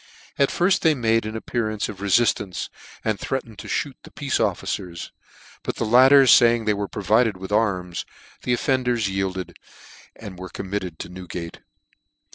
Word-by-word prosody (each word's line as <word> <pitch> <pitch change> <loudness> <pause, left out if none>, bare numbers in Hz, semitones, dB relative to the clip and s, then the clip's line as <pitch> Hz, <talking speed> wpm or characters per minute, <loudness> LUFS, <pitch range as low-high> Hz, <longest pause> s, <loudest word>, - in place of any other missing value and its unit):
At 140 - +4
firfl 185 +2 +2
they 160 -3 +3
made 115 -3 +1
an 110 +1 -4
ap - - -9
pearance 110 -3 -1
of 100 -3 -8
refinance, 100 -3 +1 0.4
and 110 -2 0
threatened 115 -6 -4
to - - -8
(hoot 140 -3 -2
the - - -13
peace 140 -2 -2
officers; 95 -4 -2 0.5
but - - -4
the - - -2
latter 130 +5 +7
faying 120 -2 +6
they 105 - +3
were 100 0 -3
provided 110 +1 +1
with 95 +1 -8
arms, 95 -5 0 0.4
the 125 - -2
offenders 125 -4 +1
yielded, 95 -1 -3 0.6
and 100 -5 -10
were 95 0 -7
committed 95 -4 -5
to - - -7
Newgate. 90 -2 -7
110 Hz, 160 wpm, -23 LUFS, 95-120 Hz, 0.6 s, latter